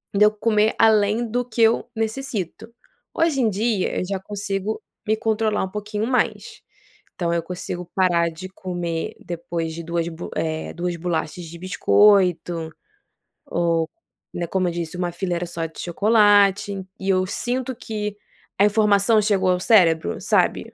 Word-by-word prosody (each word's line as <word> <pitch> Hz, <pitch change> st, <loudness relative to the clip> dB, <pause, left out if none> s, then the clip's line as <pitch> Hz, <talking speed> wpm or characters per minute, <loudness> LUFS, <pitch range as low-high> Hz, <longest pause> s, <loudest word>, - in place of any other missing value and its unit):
deu 210 Hz, +1 st, +6 dB
comer 215 Hz, 0 st, +1 dB
além 220 Hz, +1 st, +4 dB
do 245 Hz, +3 st, 0 dB
que 235 Hz, -1 st, -3 dB
eu 225 Hz, +2 st, +3 dB
necessito, 225 Hz, -, -3 dB, 0.4 s
hoje 325 Hz, -5 st, +1 dB
em 230 Hz, -, +3 dB
dia, 210 Hz, -1 st, 0 dB
eu -, -, -2 dB
já 195 Hz, -1 st, -2 dB
consigo 200 Hz, +1 st, -3 dB, 0.3 s
me 215 Hz, +1 st, +2 dB
controlar 220 Hz, -1 st, 0 dB
um 190 Hz, -, -7 dB
pouquinho 210 Hz, +1 st, -3 dB
mais. 255 Hz, 0 st, -1 dB, 0.5 s
Então, 170 Hz, -2 st, -1 dB
eu 170 Hz, -, +1 dB
consigo 180 Hz, 0 st, -5 dB
parar 175 Hz, -3 st, +3 dB
de 165 Hz, +4 st, -8 dB
comer 175 Hz, -3 st, -4 dB
depois 170 Hz, -1 st, -4 dB
de 170 Hz, +1 st, -6 dB
2, 170 Hz, 0 st, -2 dB
bo 165 Hz, +1 st, -8 dB
eh, 160 Hz, 0 st, -2 dB
2 175 Hz, 0 st, -3 dB
bolachas 170 Hz, 0 st, -3 dB
de 165 Hz, +1 st, -10 dB
biscoito, 180 Hz, -3 st, +3 dB, 0.8 s
ou, 170 Hz, -1 st, 0 dB, 0.4 s
né, 175 Hz, -, -3 dB
como 185 Hz, +1 st, 0 dB
eu -, -, -3 dB
disse 170 Hz, -1 st, -4 dB
1 175 Hz, -1 st, -1 dB
fileira 175 Hz, 0 st, -2 dB
só 170 Hz, -1 st, -3 dB
de 160 Hz, -, -14 dB
chocolate 205 Hz, 0 st, +3 dB, 0.2 s
e 190 Hz, -, -3 dB
eu 185 Hz, -1 st, +3 dB
sinto 255 Hz, +5 st, -2 dB
que 210 Hz, -2 st, -4 dB, 0.4 s
a 200 Hz, -, +6 dB
informação 210 Hz, 0 st, +4 dB
chegou 195 Hz, -3 st, +2 dB
ao 180 Hz, -, +1 dB
cérebro, 180 Hz, -6 st, +3 dB
sabe? -, -, +1 dB
195 Hz, 155 wpm, -22 LUFS, 175-215 Hz, 0.8 s, deu